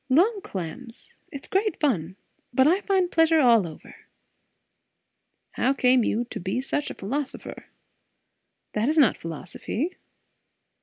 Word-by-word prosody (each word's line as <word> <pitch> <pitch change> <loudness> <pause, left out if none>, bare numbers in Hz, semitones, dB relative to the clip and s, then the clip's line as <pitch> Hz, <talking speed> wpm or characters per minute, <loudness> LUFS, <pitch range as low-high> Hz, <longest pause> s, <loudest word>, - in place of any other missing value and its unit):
Long 390 - +3
clams. 230 - -8 0.2
It's 280 -3 -8
great 395 -1 0
fun. 190 - 0 0.4
But 260 +2 +4
I 360 +6 +3
find 380 -3 +1
pleasure 325 0 +4
all 230 - +5
over." 155 - -12 1.6
"How 265 +2 +1
come 250 -2 +4
you 225 +2 0
to - - -5
be 190 +7 -2
such 280 +2 -2
a - - -7
philosopher?" 265 +8 -5 1.1
"That 215 +5 +1
is 315 - 0
not 280 -8 +5
philosophy." 185 - -5
260 Hz, 125 wpm, -25 LUFS, 215-320 Hz, 1.6 s, all